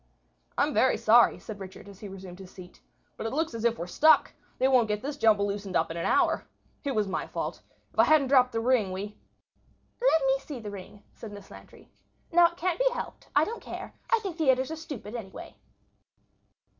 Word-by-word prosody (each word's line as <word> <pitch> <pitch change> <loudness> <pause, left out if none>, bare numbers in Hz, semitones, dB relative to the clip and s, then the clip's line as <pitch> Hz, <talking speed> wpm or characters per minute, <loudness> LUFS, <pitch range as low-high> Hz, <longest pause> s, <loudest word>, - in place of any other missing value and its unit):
"I'm - - +2
very - - +3
sorry," 90 - +5
said 200 - -9
Richard, 190 +1 -10
as 200 -1 -13
he 210 - -8
resumed 190 -2 -10
his 190 -1 -11
seat, 180 -1 -14 0.4
"but - - -3
it 225 - -5
looks 320 -1 -1
as 230 -1 -5
if 235 -1 +2
we - - -4
are - - -7
stuck. 310 - +4 0.2
They 260 - +3
won't 255 -4 +4
get 210 0 -2
this 285 +1 -3
jumble 215 -6 +3
loosened 200 -1 -4
up 165 0 +1
in 165 - -5
an 170 - -1
hour. 340 -3 +2 0.4
It 280 -3 -2
was 210 -2 +1
my 190 - -3
fault. - - -5 0.3
If - - -7
I - - +7
hadn't 300 -4 +4
dropped 255 -2 +5
the 225 - -1
ring 230 -5 +2
we—" 200 +3 -5 0.9
"Let 320 - +3
me 270 0 +2
see 275 -2 -8
the 210 -2 -7
ring," 200 +1 -11
said 225 - -10
Miss 200 -1 -12
Lantry. - - -15 0.4
"Now 345 0 +6
that 340 - -10
it - - -19
can't 360 +4 -1
be - - +4
helped, - - -7
I - - +5
don't 460 +2 -6
care. - - -8 0.2
I 465 - +6
think 370 -4 -5
theatres 265 -2 +2
are - - -3
stupid, 285 -9 -8
anyway." 215 -6 -8
225 Hz, 220 wpm, -28 LUFS, 200-290 Hz, 0.9 s, I